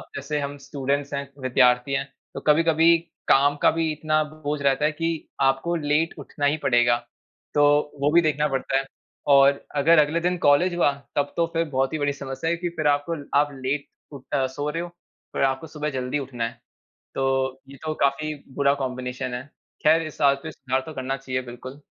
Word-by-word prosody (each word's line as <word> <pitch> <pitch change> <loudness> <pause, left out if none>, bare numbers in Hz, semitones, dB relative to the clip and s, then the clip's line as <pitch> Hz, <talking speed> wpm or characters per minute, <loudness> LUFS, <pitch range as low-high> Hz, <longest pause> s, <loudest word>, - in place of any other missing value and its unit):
जैसे 150 +2 -3
हम 145 0 -4
स्टूडेंट्स 140 +1 -3
हैं, 140 0 -3
विद्यार्थी 125 0 +3
हैं, 135 0 0 0.3
तो - - -5
कभी-कभी 165 +2 +5 0.3
काम 140 +1 +5
का - - +5
भी 165 -1 0
इतना 155 0 +1
बोझ 150 -1 -5
रहता 140 +1 +2
है 155 - +2
कि 165 +1 -3
आपको 135 +6 +2
लेट 155 +1 +1
उठना 145 0 -4
ही 145 +2 +2
पड़ेगा। 120 -1 +4 0.6
तो 145 - +4 0.4
वो 145 +1 +3
भी 170 - +7
देखना 150 -2 +1
पड़ता 135 -1 -1
है 135 - -1 0.5
और 140 0 +4
अगर 155 +3 +5
अगले 150 +2 +2
दिन 180 +1 0
कॉलेज 170 +5 +4
हुआ, 170 -4 +3 0.2
तब 145 0 0
तो 170 - +3
फिर 165 0 +1
बहुत 135 0 0
ही 155 - -1
बड़ी 145 0 0
समस्या 140 +3 -4
है 170 - 0
कि, 175 +1 -3
फिर 155 -3 -2
आप 145 0 +2 0.3
आप 145 +1 +4
लेट 135 +2 -3 0.2
उठ 140 -3 -10
अ, 135 -2 +2
सो 145 +3 -4
रहे 165 +3 -2
हो, 175 - -7 0.4
फिर - - -2
आपको 135 +3 0
सुबह 150 -1 -4
जल्दी 130 +1 -2
उठना 130 -4 -5
है। 120 +1 -11 0.6
तो 135 0 0
ये 140 - -11
तो 155 - -1
काफ़ी 150 +2 -1 0.2
बुरा 140 -1 +3
कॉम्बिनेशन 125 0 -4
है। 125 +1 -5 0.4
ख़ैर 160 +2 +5
इस 155 - -10
आदत 140 -1 +4
में - - -4
सुधार 130 0 -2
तो 160 - -8
करना 130 -1 -3
चाहिए, 130 -1 -3
बिल्कुल। 130 +3 -10
145 Hz, 200 wpm, -24 LUFS, 135-155 Hz, 0.6 s, भी